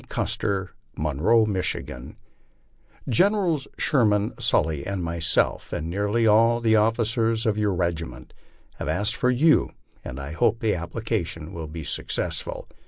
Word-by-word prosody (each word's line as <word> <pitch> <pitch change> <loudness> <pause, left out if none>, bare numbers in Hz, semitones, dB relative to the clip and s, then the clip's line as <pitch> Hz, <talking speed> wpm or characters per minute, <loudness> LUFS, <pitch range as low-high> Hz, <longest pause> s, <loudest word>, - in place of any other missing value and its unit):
CUSTER, 95 -1 -1 0.3
Monroe, 80 +10 +2
Michigan: 95 -4 -3 0.9
Generals 180 -6 +2
Sherman, 105 -6 +2
Sully, 75 -3 +1
and 100 -3 -3
myself, 85 -1 0
and 80 +2 -3
nearly 105 +4 0
all 115 +2 +4
the 110 -2 +3
officers 115 +1 +1
of 110 -2 +2
your 105 -3 0
regiment, 85 -2 -3 0.4
have - - -5
asked 105 +1 0
for 125 -2 +1
you, 150 +6 +4 0.3
and 65 - -7
I 70 +1 -6
hope 80 +7 +1
the 110 -4 +1
application 85 -2 -4
will 80 -2 -6
be 80 +1 -7
successful. - - -2
105 Hz, 130 wpm, -24 LUFS, 85-115 Hz, 0.9 s, all